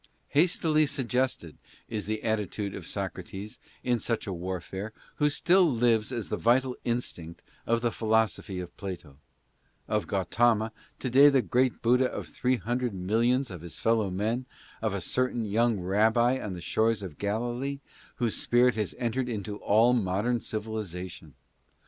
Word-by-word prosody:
Hastily 155 -1 +3
suggested, 130 - -1 0.3
is 105 -4 -4
the 110 0 -2
attitude 105 -2 -1
of - - -7
Socrates 95 +1 -5 0.2
in 120 -1 +1
such 115 -1 -1
a 95 - -3
warfare, 95 +4 -5 0.2
who 150 0 +3
still 175 +2 +4
lives 115 -2 +2
as 120 -4 -4
the - - -1
vital 125 +2 +2
instinct 90 -9 -4 0.2
of 115 0 +2
the 120 -1 +1
philosophy 110 -4 0
of 90 -1 -7
Plato; 90 -8 -7 0.7
of 105 -1 0
Gautama, 110 +3 +2 0.3
to 130 - -3
day 140 +3 +8
the 135 -3 +3
great 125 0 +1
Buddha 125 +2 +4
of - - -5
three 125 +1 0
hundred 120 +2 -2
millions 115 +7 +1
of 90 -4 -7
his 85 -1 -7
fellow 110 -3 +2
men; 110 +7 -1 0.3
of 110 -3 0
a 100 - -3
cer 130 +8 +1
tain 115 -3 -3
young 110 +1 +2
rabbi 110 +7 +3
on 105 - -4
the 90 - -7
shores 110 +4 +1
of 85 -6 -8
Galilee, 120 +7 -2 0.4
whose 120 -3 -1
spirit 125 +1 +3
has 105 -3 -3
entered 125 +1 -1
into 105 -2 -4
all 115 +5 +4
modern 115 +2 +1
civilization. 95 - -5
110 Hz, 155 wpm, -28 LUFS, 100-125 Hz, 0.7 s, day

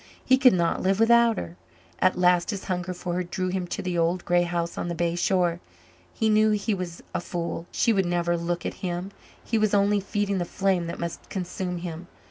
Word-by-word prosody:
He 260 0 +4
could 255 -2 +7
not 170 -2 +1
live 190 +2 +1
without 235 -1 +5
her. 85 +1 -6 0.4
At 185 - +3
last 180 -1 +3
his 200 -3 -3
hunger 180 -1 -2
for 180 0 -4
her 180 +1 0
drew 185 +1 -3
him 180 -1 -2
to - - -4
the 180 -2 -1
old 170 +2 0
grey 175 0 +3
house 170 -1 -2
on - - -3
the 170 - -3
bay 170 0 0
shore. 175 -1 +1 0.5
He 220 - 0
knew 215 0 +4
he 210 +1 0
was 180 -3 -5
a - - -1
fool 170 -1 -4
she 230 - +2
would 195 -3 +1
never 175 0 +1
look 170 0 -3
at - - -2
him; 180 +1 -3 0.3
he 225 - +1
was 215 -1 +2
only 205 +1 +3
feeding 200 -1 -1
the 175 - -1
flame 185 -1 0
that 170 - -5
must 170 -1 -6
consume 180 -1 -4
him. 170 0 -6
180 Hz, 220 wpm, -26 LUFS, 175-200 Hz, 0.5 s, could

